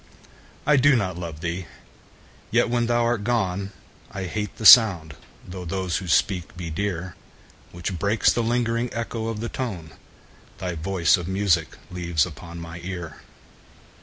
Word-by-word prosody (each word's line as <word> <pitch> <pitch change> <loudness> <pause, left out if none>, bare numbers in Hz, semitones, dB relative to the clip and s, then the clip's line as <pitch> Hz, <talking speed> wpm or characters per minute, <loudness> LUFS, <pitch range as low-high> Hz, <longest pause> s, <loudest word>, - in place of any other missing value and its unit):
I 150 - +4
do 140 +1 +5
not 95 -6 -1
love 85 -3 -7
thee!—yet, 85 - -5
when 120 -1 +1
thou 120 0 +2
art 115 -3 0
gone, 100 -4 -1 0.4
I 100 -2 -6
hate 105 +3 -4
the 110 - -6
sound 95 -11 +8 0.3
(though 90 0 -7
those 90 0 -2
who 95 - -6
speak 90 0 0
be 85 -2 -5
dear) 90 0 -3 0.6
10 - - -26
Which 90 +1 -5
breaks 100 +5 +3
the 120 - 0
lingering 115 0 0
echo 115 -1 -3
of 110 -2 -4
the 115 - -3
tone 100 -12 -5 0.7
Thy 90 -1 -4
voice 85 +3 +2
of 90 -1 -6
music 95 -4 0
leaves 85 -3 0
upon 85 +1 -9
my 85 0 -8
ear. 85 -4 -6
95 Hz, 155 wpm, -24 LUFS, 85-115 Hz, 0.7 s, sound